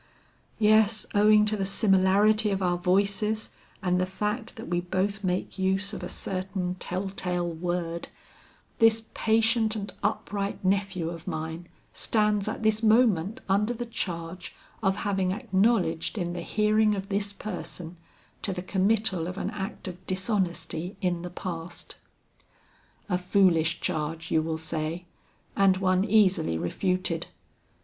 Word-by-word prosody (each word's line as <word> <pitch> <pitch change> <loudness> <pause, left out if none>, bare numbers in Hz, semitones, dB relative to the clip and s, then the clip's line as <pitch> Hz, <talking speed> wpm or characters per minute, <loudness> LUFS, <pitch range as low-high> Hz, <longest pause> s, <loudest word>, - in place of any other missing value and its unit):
Yes, 215 0 +4
owing 210 +1 +6
to 215 0 +1
the 200 - -1
similarity 200 +2 +3
of 195 -1 -1
our 175 -1 +1
voices 200 +4 +1 0.3
and 180 -1 +2
the 185 - 0
fact 210 +5 -3
that 225 - -8
we 175 0 0
both 190 +3 -1
make 185 +1 -2
use 190 +2 +1
of - - -5
a - - -5
certain 185 -1 -3
tell 185 +2 -3
tale 180 -2 -2
word, 170 0 -3 0.7
this 225 -1 +4
patient 225 0 +2
and 200 -3 -4
upright 200 -1 -2
nephew 190 -3 0
of 165 -1 -9
mine 160 +2 -4 0.3
stands 210 -2 +1
at 220 - -3
this 220 0 +2
moment 220 -4 +3
under 210 +5 +1
the 240 +1 -4
charge 175 -5 -5 0.3
of 195 -3 +2
having 190 -2 +1
acknowledged 195 -4 +1
in 175 -3 -2
the 175 - -4
hearing 215 +3 +2
of 195 0 -5
this 200 0 -1
person, 180 -4 -7 0.5
to 200 - -2
the 180 -1 -4
committal 195 -2 +1
of 185 +1 -6
an - - -2
act 195 0 -6
of 180 0 -8
dishonesty 185 -2 -2
in 175 -3 0
the 180 - -5
past. 175 -1 -6 1.1
A 180 -4 0
foolish 180 -3 +3
charge 160 +1 -3
you 160 - +4
will 160 0 -2
say, 160 +2 -3 0.5
and 195 -1 +4
one 185 0 +2
easily 190 - +3
refuted. 175 - 0
190 Hz, 140 wpm, -27 LUFS, 175-210 Hz, 1.1 s, owing